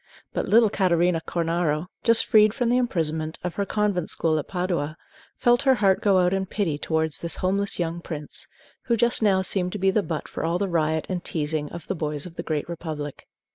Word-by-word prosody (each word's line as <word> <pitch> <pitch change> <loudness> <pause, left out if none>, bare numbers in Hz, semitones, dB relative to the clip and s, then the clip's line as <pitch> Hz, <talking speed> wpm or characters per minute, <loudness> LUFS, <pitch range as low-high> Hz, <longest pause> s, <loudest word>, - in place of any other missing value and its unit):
But - - -2
little 225 -1 +5
Catarina 175 -3 +2
Cornaro, 165 -2 0 0.2
just 230 -1 +5
freed 215 0 +5
from 245 -3 0
the 245 - +3
imprisonment 160 -9 -1
of 180 -1 -2
her 200 -1 -2
convent 205 -5 0
school 160 -1 +1
at 145 - -6
Padua, 175 -4 -2 0.4
felt 240 +1 +3
her 265 -2 +4
heart 195 -5 +3
go 200 -2 +4
out 180 0 +3
in 190 0 -1
pity 175 -8 -1
towards 160 -1 -1
this 170 - -4
homeless 200 +2 -1
young 170 0 -2
prince, 150 -4 -6 0.4
who 235 -2 +2
just 235 +1 +3
now 195 -3 +3
seemed 180 -1 -1
to - - -2
be 195 0 +2
the 210 - +2
butt 165 -5 -4
for - - -5
all 165 +2 +1
the 200 +2 -1
riot 160 -3 0
and 180 -2 -3
teasing 150 -1 -2
of 170 -3 -8
the - - -2
boys 150 -4 -3
of 175 -2 -10
the - - -4
Great 155 -2 -2
Republic. 155 -4 -6
175 Hz, 215 wpm, -25 LUFS, 160-200 Hz, 0.4 s, little